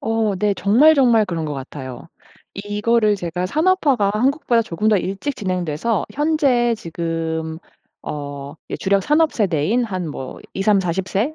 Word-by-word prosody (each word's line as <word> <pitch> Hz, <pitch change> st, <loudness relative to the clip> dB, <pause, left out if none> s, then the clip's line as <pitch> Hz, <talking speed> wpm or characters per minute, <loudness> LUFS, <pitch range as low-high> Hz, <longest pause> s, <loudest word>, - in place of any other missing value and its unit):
어 225 Hz, -2 st, 0 dB
네. 205 Hz, +2 st, +1 dB
정말 245 Hz, +13 st, +5 dB
정말 240 Hz, -6 st, +4 dB
그런 170 Hz, -4 st, -3 dB
것 150 Hz, -2 st, -3 dB
같아요. 130 Hz, +1 st, -8 dB, 0.5 s
이거를 210 Hz, +1 st, +1 dB
제가 180 Hz, 0 st, -3 dB
산업화가 290 Hz, -, +2 dB
한국보다 255 Hz, 0 st, +2 dB
조금 210 Hz, +1 st, -1 dB
더 215 Hz, -, +4 dB
일찍 195 Hz, +10 st, -3 dB
진행돼서 185 Hz, +2 st, -1 dB
현재 275 Hz, -6 st, +2 dB
지금 165 Hz, -3 st, -4 dB, 0.4 s
어 145 Hz, 0 st, -6 dB
이 -, -, -4 dB
주력 195 Hz, 0 st, +1 dB
산업 310 Hz, +1 st, +2 dB
세대인 205 Hz, +4 st, +1 dB
한 185 Hz, -6 st, -4 dB
뭐 130 Hz, -2 st, -7 dB, 0.2 s
2-3-40 190 Hz, -2 st, +1 dB
세 225 Hz, -, -1 dB
200 Hz, 265 characters per minute, -20 LUFS, 165-235 Hz, 0.5 s, 정말